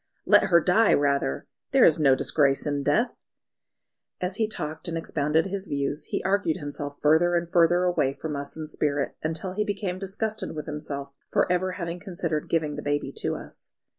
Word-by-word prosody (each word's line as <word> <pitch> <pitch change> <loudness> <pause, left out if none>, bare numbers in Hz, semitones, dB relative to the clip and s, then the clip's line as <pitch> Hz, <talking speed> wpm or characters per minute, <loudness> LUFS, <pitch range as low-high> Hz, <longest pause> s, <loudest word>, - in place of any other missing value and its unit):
"Let - - +6
her 170 -3 +5
die 195 +6 +4
rather! 140 - 0 0.3
There - - +7
is 160 - +4
no 135 -3 +5
disgrace 140 0 +2
in 145 -1 -1
death." 225 - +1 1.1
As 185 +2 -2
he 220 - +1
talked 155 -4 -4
and 165 -1 -2
expounded 160 0 0
his 195 0 -4
views, 140 +1 -2
he - - -3
argued 190 -4 +1
himself 145 -1 -6
further 160 +4 +4
and 170 0 -1
further 175 +1 +4
away 175 -7 +1
from 155 +1 -5
us 140 +2 -6
in 155 - -4
spirit, 145 -2 -1
until 165 +4 -2
he 210 +2 0
became 200 -3 -3
disgusted 210 0 -3
with 150 - -5
himself 145 -2 -5 0.2
for - - +2
ever 180 +1 0
having 170 -1 -4
considered 170 -5 -3
giving 155 -3 0
the - - -4
baby 145 0 -1
to - - -1
us. - - -11
160 Hz, 185 wpm, -26 LUFS, 145-180 Hz, 1.1 s, There